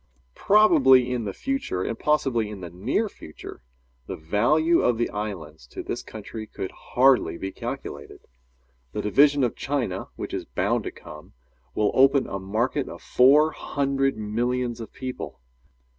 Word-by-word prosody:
Probably 135 - +5
in 120 -3 -2
the 100 - -2
future, 270 - -2
and 115 - -4
possibly 130 -7 +1
in 105 -3 -8
the 90 -2 -7
near 115 - -1
future, 80 - -11 0.5
the - - -4
value 145 - +2
of 120 -2 +2
the 120 - -1
islands 80 -10 -6
to - - -8
this - - -4
country 110 0 -8
could 95 - -6
hardly 130 -8 +2
be 95 +2 -5
calculated. - - -7 0.7
The 105 - -3
division 140 +6 +4
of 120 - 0
China 125 -10 -2
which - - -6
is - - -3
bound - - -1
to - - -3
come, - - -13 0.4
will 105 -1 +2
open 135 +1 +4
a 100 - -5
market 115 +8 -1
of - - -9
four 145 +5 +5
hundred 135 -3 -1
millions 120 +3 -2
of 115 - -8
people. 130 - -7
120 Hz, 155 wpm, -25 LUFS, 105-140 Hz, 0.7 s, Probably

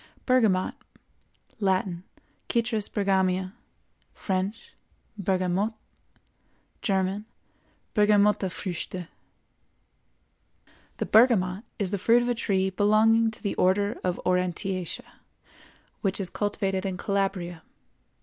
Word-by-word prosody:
BERGAMOT. 220 -8 +3 0.9
Latin—Citrus 200 +4 -2
Bergamia; 190 -2 +1 0.6
French—Bergamote; 195 0 -3 1.1
German—Bergamottefrüchte. 195 -2 -1 1.9
The - - -1
bergamot 215 -3 +4
is 195 -4 -2
the 200 - -1
fruit 235 +5 +4
of 245 - -1
a - - +3
tree 190 -4 0
belonging 220 +3 +4
to 220 - -10
the 200 - -1
Order 200 +3 +2
of 180 -1 -1
Aurantiaceæ, 180 0 -1 1.0
which 195 -1 0
is 185 -3 -2
cultivated 195 -2 -1
in 190 -2 -3
Calabria. 190 -4 -2
195 Hz, 80 wpm, -27 LUFS, 185-215 Hz, 1.9 s, bergamot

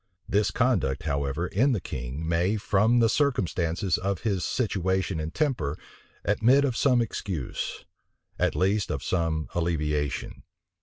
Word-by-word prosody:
This 105 +1 +2
conduct, 115 - +1
however, 70 +1 -1
in 125 +9 +2
the 110 - 0
king 65 +1 -5
may, 90 +6 +1
from 110 +2 +2
the 115 - +5
circumstances 95 - 0
of 100 -1 -2
his 100 -6 0
situation 95 -7 0
and 80 +1 -3
temper, 85 - -1 0.5
admit 120 +8 +4
of 130 -4 -1
some 125 -2 +3
excuse; 90 - -4 0.5
at - - +1
least, 95 +2 +1
of 70 -3 -3
some 80 -3 0
alleviation. 75 -4 -1
95 Hz, 135 wpm, -27 LUFS, 80-110 Hz, 0.5 s, the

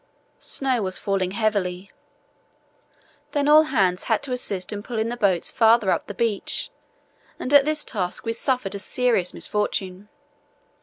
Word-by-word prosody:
Snow 260 -4 0
was 185 -2 +1
falling 195 -2 -1
heavily. 200 -3 -2 1.4
Then 285 -1 +1
all 305 +1 +7
hands 185 -10 0
had - - 0
to 275 - -2
assist 200 -7 -2
in 205 - -5
pulling 225 0 -3
the 240 - -3
boats 195 -7 +1
farther 225 -3 +4
up - - -1
the 205 - -7
beach, 225 -3 -1 0.7
and 260 - -4
at 285 -1 +7
this 305 0 -1
task 185 -3 -4
we 230 - -1
suffered 245 -4 0
a 200 - -5
serious 225 -3 0
misfortune. 200 -1 -2
210 Hz, 150 wpm, -23 LUFS, 190-250 Hz, 1.4 s, all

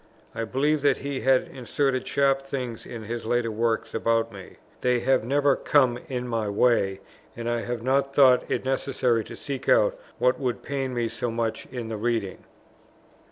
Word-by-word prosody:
I 115 - -3
believe 145 +6 +1
that 140 -2 +3
he 140 -1 -4
has 130 -1 +3
inserted 130 0 -1
sharp 135 -1 +2
things 130 -4 -5
in 115 -2 -7
his 115 +2 -5
later 115 0 0
works 115 +1 -1
about 115 0 +1
me. 95 -2 -11 0.3
They 125 -1 +2
have 130 0 +2
never 140 +3 +2
come 130 -5 +2
in 125 -2 -3
my 115 -3 -1
way, 100 -3 +2 0.4
and 120 0 -4
I 120 0 0
have 120 -1 -4
not 135 +2 +1
thought 130 -3 +5
it - - -1
necessary 130 -3 0
to - - -9
seek 140 -2 -5
out - - +4 0.2
what 125 0 +2
would 125 -3 -2
pain 135 -2 -3
me 120 -1 0
so 115 +1 -3
much 115 -1 -2
in 120 -3 -6
the 110 - -3
reading. 110 -3 -2
125 Hz, 180 wpm, -26 LUFS, 115-135 Hz, 0.4 s, thought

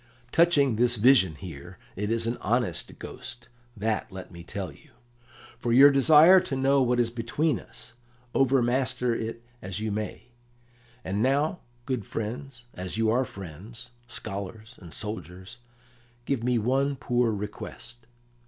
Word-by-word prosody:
"Touching 145 -8 +4
this 120 +1 +4
vision 105 - +5
here, 85 +2 -10 0.2
it 105 +2 -2
is 115 0 +1
an 115 +1 0
honest 115 -4 0
ghost, 120 -1 -9 0.3
that 110 +1 -1
let 95 -1 -9
me 85 -1 -10
tell - - -5
you. - - -19 0.7
For 120 - -1
your 135 +4 +8
desire 155 +6 +7
to 140 - -4
know 135 +1 +3
what 125 -1 +2
is 115 -1 +2
between 120 +7 0
us, - - -10 0.4
overmaster 130 -1 +2
it 115 0 -4 0.2
as 95 +2 -5
you 110 0 -2
may. 105 +3 -5 0.7
And 100 +3 -2
now, 145 +7 +1 0.3
good 130 -5 -2
friends, 120 +5 -5
as 90 +3 -5
you 110 -1 +2
are 130 +3 +2
friends, 105 +7 -9 0.2
scholars, 110 +2 -6
and 85 -3 -11
soldiers, 95 +1 -7 0.7
give 130 -3 -1
me 125 0 +2
one 135 +5 +1
poor 125 -3 +1
request." 110 +3 -7
120 Hz, 145 wpm, -27 LUFS, 105-130 Hz, 0.7 s, your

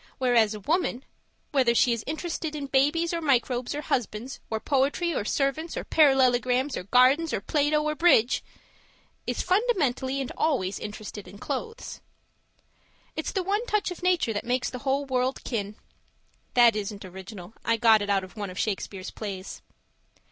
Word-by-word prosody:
Whereas 235 -4 +3
a - - -7
woman 295 - -1 0.5
whether 255 -5 +3
she 240 0 +4
is 230 - -4
interested 315 0 -3
in 290 -2 -4
babies 295 +6 +2
or 335 - -1
microbes 255 -3 +1
or 295 - -3
husbands 245 -2 -3
or 220 - -1
poetry 285 +7 +1
or 235 - -1
servants 280 +8 -1
or - - -3
parallelograms 260 -2 +3
or 180 - -5
gardens 260 - +4
or - - 0
Plato 295 +7 +1
or 305 0 0
bridge 300 -7 +4 0.8
is - - -1
fundamentally 320 - +1
and 270 - -3
always 225 -12 0
interested 210 -1 -7
in 195 +3 -12
clothes. 455 - -5 1.1
It's - - -3
the 380 - -1
one 405 +4 0
touch 420 -4 0
of 360 - -8
nature 355 -10 +2
that 205 - -3
makes 250 +1 -1
the 250 - -6
whole 275 +2 0
world 260 0 -1
kin. 210 -3 -3 0.8
(That 240 -3 +6
isn't 205 -1 -4
original. 190 +1 -10
I 230 0 +2
got 225 -2 +5
it 205 - -3
out 195 -1 +2
of 185 - -11
one 205 -3 -4
of 185 - -9
Shakespeare's 195 -2 -3
plays). 195 -3 -6
255 Hz, 165 wpm, -26 LUFS, 215-300 Hz, 1.1 s, That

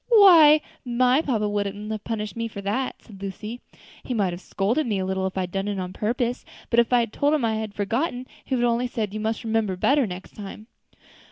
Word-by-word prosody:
_ - - -49
why 340 -9 +8 0.2
my 250 +3 +3
papa 225 -9 0
wouldn't 205 +1 -3
have 215 -1 -4
punished 215 -2 -4
me 230 0 -2
for 215 - -8
that," 210 +7 -2
said 200 -4 -14
Lucy. 210 +4 -6 0.4
"He 250 - -3
might 195 -5 +1
have 175 - -7
scolded 230 +12 0
me 210 -3 0
a 190 - -1
little 190 0 -1
if 190 - -7
I - - +1
had 180 -1 -4
done 195 +1 -2
it 205 -1 -2
on 185 -1 -4
purpose, 240 +4 -1 0.3
but 235 - +4
if 235 - +3
I 245 -1 +5
had 230 -2 -3
told 290 +2 +2
him 275 -6 0
I 220 -1 0
had 220 -2 -5
forgotten, 245 +5 -1 0.2
he 265 - -1
would 240 - 0
only 240 +1 +1
have 245 - -6
said, 215 -4 -2
'You 215 - -3
must 220 +3 -2
remember 220 -4 0
better 270 +6 +2
next 180 0 -8
time.'" 210 +1 -8
220 Hz, 245 wpm, -24 LUFS, 200-245 Hz, 0.4 s, why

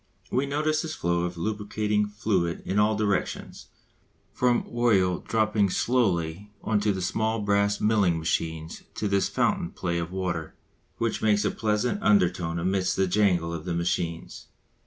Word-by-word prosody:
We 135 +2 +1
notice 155 +2 0
this 155 -1 -5
flow 85 0 0
of 90 0 -5
lubricating 105 +2 -1
fluid 100 -5 -1
in 100 - 0
all 105 +1 +3
directions, 100 -3 -2 0.7
from 125 -1 +2
oil 100 -7 +2
dropping 110 -2 +1
slowly 95 -5 0
on 105 -2 +1
to 105 0 +1
the 95 -2 -3
small 110 +4 0
brass 100 0 +1
milling 105 -6 +2
machines 80 0 -2
to 105 - -1
this 100 -1 +1
fountain 85 - 0
play 85 -2 -2
of 85 0 -4
water 90 -4 -3 0.4
which 115 -1 -1
makes 105 -1 +2
a - - +2
pleasant 110 - -1
undertone 90 -4 +2
amidst 95 +2 0
the 95 - +2
jangle 90 -3 +2
of 85 -2 -5
the 90 -2 -2
machines. 85 -1 -3
100 Hz, 155 wpm, -26 LUFS, 85-110 Hz, 0.7 s, all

